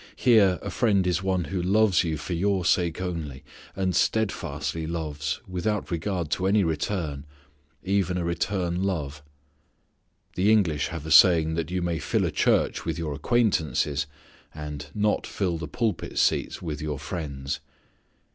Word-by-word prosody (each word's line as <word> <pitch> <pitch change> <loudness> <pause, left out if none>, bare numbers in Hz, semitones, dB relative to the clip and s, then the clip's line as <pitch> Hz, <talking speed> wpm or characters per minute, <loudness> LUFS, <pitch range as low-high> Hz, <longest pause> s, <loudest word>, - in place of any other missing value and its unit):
Here, 105 -7 +4
a - - -4
friend 100 -6 +2
is 90 0 +1
one 95 -2 0
who 95 +1 -3
loves 100 0 +3
you 80 -2 -2
for 85 - -5
your 95 +1 0
sake 85 -2 +2
only 80 -7 -4 0.3
and 95 -2 0
steadfastly 80 -8 -1
loves 75 -3 -3
without 95 +2 -2
regard 85 -1 -2
to 95 +2 0
any 100 +1 +4
return, 80 -3 -2 0.6
even 95 -2 +1
a 90 - -1
return 90 0 -1
love. 75 -7 -2 1.1
The 100 +4 +3
English 85 -10 +2
have 80 -3 -6
a 80 - -5
saying 80 -3 +7
that 80 0 -2
you 90 0 -2
may 85 -2 -1
fill 75 - 0
a - - -1
church - - +2
with - - -3
your 80 -3 -3
acquaintances, 75 - +1 0.5
and 75 -1 -6
not 105 0 +1
fill 90 -5 -2
the 80 - -5
pulpit 110 - -2
seats - - +1
with 75 -3 -4
your 75 -2 -3
friends. 70 -3 -4
85 Hz, 155 wpm, -26 LUFS, 75-95 Hz, 1.1 s, saying